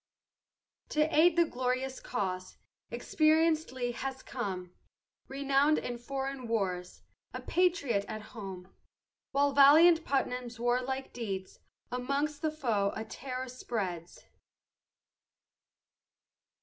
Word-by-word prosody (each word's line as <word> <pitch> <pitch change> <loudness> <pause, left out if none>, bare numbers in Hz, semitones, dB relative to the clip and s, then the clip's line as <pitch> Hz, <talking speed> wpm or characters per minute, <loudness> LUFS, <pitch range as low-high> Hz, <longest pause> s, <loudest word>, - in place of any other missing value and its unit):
To 305 +2 +1
aid 325 +2 +6
the 340 -1 +5
glorious 255 -1 -2
cause, 185 -5 -4 0.3
Experienc'd 315 0 +2
Lee 245 -2 -2
has 265 +2 -5
come, 185 -7 -5 0.5
Renown'd 280 +2 +2
in 240 -1 -4
foreign 270 0 -4
wars, 185 -5 -2 0.3
A - - -3
patriot 285 - +1
at 215 0 -6
home. 190 -4 -8 0.6
While 285 +1 +3
valiant 320 +4 +7
Putnam's 250 -4 -2
warlike 255 +2 -1
deeds 195 -6 -5 0.3
Amongst 280 +4 -1
the 315 - +1
foe 230 -10 0
a 220 - -4
terror 255 +3 -5
spreads. 195 -9 -5
255 Hz, 100 wpm, -31 LUFS, 220-285 Hz, 0.6 s, valiant